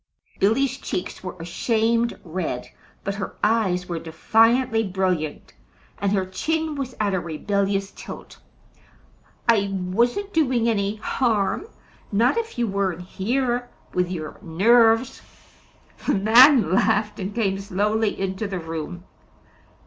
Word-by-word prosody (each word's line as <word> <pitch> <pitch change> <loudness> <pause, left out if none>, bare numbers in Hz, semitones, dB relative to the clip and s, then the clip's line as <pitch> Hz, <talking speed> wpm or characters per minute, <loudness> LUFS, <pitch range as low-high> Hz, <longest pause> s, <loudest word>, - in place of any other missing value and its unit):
Billy's 260 +7 +2
cheeks 180 - -4
were 185 - -6
a 165 - -6
shamed 230 +5 0
red, 160 -7 -4 0.3
but 200 - -2
her 195 -1 -5
eyes 195 -5 +1
were 170 -2 -3
defiantly 225 +8 +2
brilliant, 185 -6 -2 0.5
and 200 -1 0
her 195 -2 +1
chin 315 +12 -2
was 270 -3 -5
at 205 -2 +1
a 190 - +1
rebellious 195 +4 -1
tilt. - - -10 1.1
"I 205 -4 +3
wasn't 235 - 0
doing 255 -7 +2
any 205 -2 0
harm; 220 - 0 0.4
not 230 - +3
if 455 - -3
you 240 - +1
weren't 190 -3 -1
here 245 +6 -1 0.2
with 180 -1 0
your 160 -4 -6
NERVES!" 225 +7 +3 0.9
The - - +3
man 225 - +6
laughed 210 +1 +2
and 195 +2 -4
came 195 -4 0
slowly 210 +2 0
into 195 +2 -2
the 195 -2 -4
room. 165 +1 -6
205 Hz, 125 wpm, -23 LUFS, 185-235 Hz, 1.1 s, man